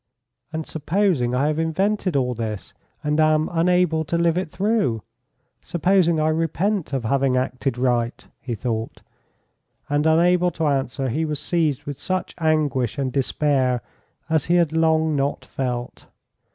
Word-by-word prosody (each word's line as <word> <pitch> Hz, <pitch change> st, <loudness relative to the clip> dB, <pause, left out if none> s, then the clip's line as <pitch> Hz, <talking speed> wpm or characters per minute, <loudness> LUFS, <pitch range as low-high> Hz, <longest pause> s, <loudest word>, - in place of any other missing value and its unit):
"And 160 Hz, -1 st, -4 dB
supposing 160 Hz, -6 st, 0 dB
I 135 Hz, +3 st, +2 dB
have 155 Hz, +1 st, 0 dB
invented 185 Hz, +2 st, 0 dB
all 125 Hz, -2 st, +1 dB
this, 110 Hz, -3 st, -5 dB, 0.3 s
and 150 Hz, +1 st, 0 dB
am 155 Hz, 0 st, +3 dB
unable 170 Hz, -1 st, +2 dB
to 170 Hz, -, -1 dB
live 170 Hz, -1 st, +2 dB
it 180 Hz, -2 st, -2 dB
through 190 Hz, -, 0 dB, 0.6 s
supposing 175 Hz, -1 st, +2 dB
I 155 Hz, 0 st, +2 dB
repent 165 Hz, +4 st, 0 dB
of 135 Hz, -3 st, -2 dB
having 135 Hz, +1 st, +2 dB
acted 130 Hz, 0 st, -1 dB
right," 120 Hz, -1 st, 0 dB
he 120 Hz, -3 st, -4 dB
thought; 115 Hz, 0 st, -4 dB, 0.9 s
and 145 Hz, +2 st, +2 dB
unable 175 Hz, +2 st, +4 dB
to 160 Hz, -1 st, -3 dB
answer 135 Hz, -2 st, 0 dB
he 155 Hz, +8 st, -1 dB
was 150 Hz, -2 st, -2 dB
seized 155 Hz, -3 st, 0 dB
with 145 Hz, -2 st, -6 dB
such 185 Hz, -1 st, -2 dB
anguish 150 Hz, -6 st, +1 dB
and 135 Hz, -3 st, -2 dB
despair 130 Hz, -3 st, +1 dB, 0.4 s
as 160 Hz, -1 st, +1 dB
he 175 Hz, -, +2 dB
had 170 Hz, -3 st, +3 dB
long 160 Hz, -1 st, +2 dB
not 140 Hz, +1 st, -1 dB
felt. 125 Hz, -2 st, -4 dB
155 Hz, 150 wpm, -22 LUFS, 130-165 Hz, 0.9 s, unable